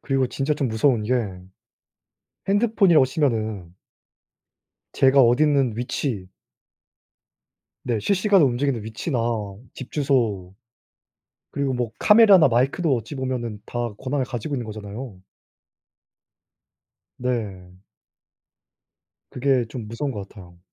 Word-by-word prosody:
그리고 135 -2 0
진짜 135 +4 -2
좀 140 -3 -1
무서운게 110 0 +1 1.4
핸드폰이라고 200 - +4
치면은 110 - -2 1.2
제가 135 +1 +4
어딨는 135 -1 +3
위치 120 -6 -3 1.6
네 115 -3 0
실시간으로 195 - +3
움직이는 125 -1 -1
위치나 115 +5 -4 0.6
집 130 - -10
주소 115 -11 0 1.0
그리고 140 -2 -1
뭐 120 -3 -2
카메라나 210 - +6
마이크도 135 +6 +1
어찌보면은 120 -3 -4
다 120 -3 -4
권한을 135 0 -2
가지고 125 +4 -4
있는 120 -3 -4
거잖아요. 105 +1 -8 2.0
네. 105 -8 -4 1.6
그게 130 -1 +1
좀 115 -3 -7
무서운 135 +6 -3
것 100 -2 -7
같아요. 90 -4 -15
125 Hz, 240 characters per minute, -23 LUFS, 110-140 Hz, 2.0 s, 카메라나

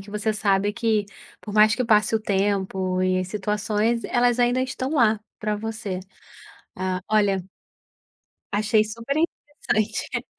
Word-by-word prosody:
que 200 +1 -12
você 210 +1 -1
sabe 205 -1 +1
que, 220 -1 +1 0.3
por 210 - -9
mais 215 +1 +5
que 250 - -1
passe 215 -1 +3
o 220 - +2
tempo, 190 -2 0
e 185 0 +1
situações, 210 +3 -1
elas 245 0 +2
ainda 245 +1 +3
estão 260 +2 -3
lá 225 -7 +3 0.2
pra 210 -1 -1
você. 215 -3 -4 0.7
Ah, 185 0 -2
olha 205 -2 +3 1.2
achei 215 +1 +3
super 230 +6 -4
interessante 290 -9 -2
215 Hz, 135 wpm, -24 LUFS, 200-230 Hz, 1.2 s, mais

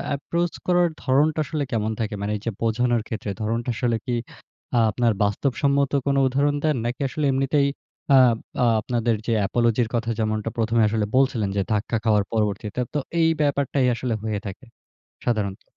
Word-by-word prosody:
approach 170 +4 -2
করার 175 -1 +3
ধরনটা 150 +4 +2
আসলে 150 -1 -2
কেমন 110 -1 0
থাকে? 110 -1 -2
মানে 100 +1 -2
এইযে 105 +3 -4
বোঝানোর 120 +1 +1
ক্ষেত্রে, 110 -2 -4
ধরণটা 115 +3 -1
আসলে 120 0 0
কি 125 - -2 0.8
আপনার 115 +1 +1
বাস্তবসম্মত 140 +6 +1
কোন 140 -1 +1
উদাহরণ 140 +3 +1
দেন? 155 -2 +2
নাকি 120 +4 -3
আসলে 150 +3 -2
এমনিতেই 135 +2 +2 0.5
আব 125 -3 +5 0.3
আ - - +4
আপনাদের 115 -1 0
যে, 115 - +2
apology 120 +1 +2
র - - -9
কথা, 115 0 -1
যেমনটা 110 0 -1
১ম 115 0 0
এ - - +5
আসলে 110 -1 0
বলছিলেন 130 -6 +2
যে, - - +3
ধাক্কা 110 +2 0
খাওয়ার 105 -3 +3
পরবর্তীতে। 105 0 -1
তো 150 - +1 0.2
এই 160 - +4
ব্যাপারটাই 140 -2 +1
আসলে 120 0 -2
হয়ে 110 -2 -2
থাকে, 100 +7 -8 0.6
সাধারণত। 105 -5 -1
120 Hz, 170 wpm, -23 LUFS, 110-140 Hz, 0.8 s, আব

